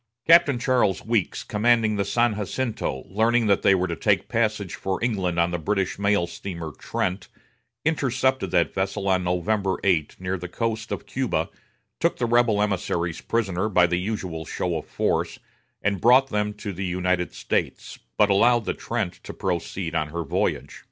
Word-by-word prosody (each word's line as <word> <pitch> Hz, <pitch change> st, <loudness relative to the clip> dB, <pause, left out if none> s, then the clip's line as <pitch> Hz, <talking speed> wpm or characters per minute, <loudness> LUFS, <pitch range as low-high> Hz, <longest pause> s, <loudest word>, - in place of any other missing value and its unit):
Captain 165 Hz, -5 st, +6 dB
Charles 120 Hz, -6 st, +1 dB
Wilkes, 110 Hz, -5 st, 0 dB
commanding 110 Hz, 0 st, +2 dB
the 100 Hz, -, +1 dB
San 115 Hz, +3 st, +2 dB
Jacinto, 105 Hz, -, -3 dB
learning 115 Hz, +4 st, +2 dB
that 100 Hz, -2 st, +3 dB
they 95 Hz, -, +5 dB
were 90 Hz, -1 st, +1 dB
to 85 Hz, -, -3 dB
take -, -, +1 dB
passage 110 Hz, -5 st, 0 dB
for 95 Hz, -1 st, -2 dB
England 95 Hz, -8 st, 0 dB
on 85 Hz, +1 st, +2 dB
the 85 Hz, -, -2 dB
British 95 Hz, +2 st, -1 dB
mail 100 Hz, -3 st, +2 dB
steamer 85 Hz, -2 st, -6 dB
Trent, 90 Hz, +6 st, -3 dB, 0.6 s
intercepted 130 Hz, -, +1 dB
that 85 Hz, -3 st, +1 dB
vessel 95 Hz, +1 st, -2 dB
on 95 Hz, -1 st, +2 dB
November 95 Hz, +2 st, 0 dB
8 85 Hz, -6 st, +1 dB
near 95 Hz, 0 st, -3 dB
the 90 Hz, -, -6 dB
coast 110 Hz, +3 st, -3 dB
of -, -, -4 dB
Cuba, -, -, -1 dB, 0.5 s
took -, -, +1 dB
the 120 Hz, -, 0 dB
rebel 115 Hz, -3 st, +3 dB
emissaries 85 Hz, -4 st, -2 dB
prisoner 105 Hz, -3 st, -1 dB
by 90 Hz, -3 st, +5 dB
the 85 Hz, 0 st, 0 dB
usual 90 Hz, -5 st, -4 dB
show 85 Hz, +2 st, -2 dB
of 80 Hz, -, -5 dB
force, -, -, -1 dB, 0.5 s
and 100 Hz, -3 st, 0 dB
brought 130 Hz, +3 st, +5 dB
them 105 Hz, -1 st, -1 dB
to 105 Hz, -1 st, -6 dB
the 95 Hz, +2 st, -5 dB
United 90 Hz, -1 st, 0 dB
States, -, -, -3 dB, 0.2 s
but 105 Hz, -1 st, +4 dB
allowed 120 Hz, +3 st, +4 dB
the -, -, -1 dB
Trent -, -, -4 dB
to -, -, -8 dB
proceed 90 Hz, -1 st, -3 dB
on 80 Hz, -2 st, 0 dB
her 85 Hz, +2 st, -4 dB
voyage. 70 Hz, -, -2 dB
100 Hz, 170 wpm, -24 LUFS, 90-115 Hz, 0.6 s, Captain